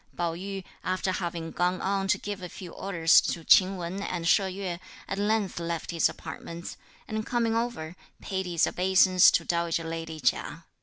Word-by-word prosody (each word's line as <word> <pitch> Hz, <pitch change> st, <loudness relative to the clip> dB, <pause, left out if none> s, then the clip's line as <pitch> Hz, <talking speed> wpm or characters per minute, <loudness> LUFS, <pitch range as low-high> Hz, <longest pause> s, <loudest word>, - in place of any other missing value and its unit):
Pao 170 Hz, -1 st, 0 dB
yü, 195 Hz, +2 st, -6 dB, 0.2 s
after 185 Hz, +1 st, -1 dB
having 170 Hz, -3 st, -4 dB
gone 180 Hz, +1 st, 0 dB
on 195 Hz, 0 st, -1 dB
to -, -, +3 dB
give 205 Hz, -2 st, -6 dB
a 180 Hz, -, -6 dB
few 175 Hz, -1 st, -9 dB
orders 170 Hz, -4 st, +4 dB
to 165 Hz, -, -3 dB
Ch'ing 190 Hz, +3 st, +5 dB
Wen 180 Hz, +3 st, -4 dB
and 175 Hz, -4 st, -3 dB
She 200 Hz, -, +5 dB
Yueh, 190 Hz, -2 st, -4 dB, 0.3 s
at 195 Hz, -, -3 dB
length 205 Hz, -3 st, 0 dB
left 170 Hz, -1 st, -3 dB
his 165 Hz, -1 st, +3 dB
apartments, 170 Hz, +1 st, -8 dB, 0.3 s
and 215 Hz, 0 st, -3 dB
coming 230 Hz, -1 st, 0 dB
over, 230 Hz, -9 st, -3 dB, 0.2 s
paid 190 Hz, -1 st, -3 dB
his 170 Hz, -2 st, +2 dB
obeisance 185 Hz, 0 st, +5 dB
to -, -, +1 dB
dowager 170 Hz, -1 st, 0 dB
lady 165 Hz, -1 st, -5 dB
Chia. 125 Hz, -, -1 dB
180 Hz, 175 wpm, -28 LUFS, 170-195 Hz, 0.3 s, Ch'ing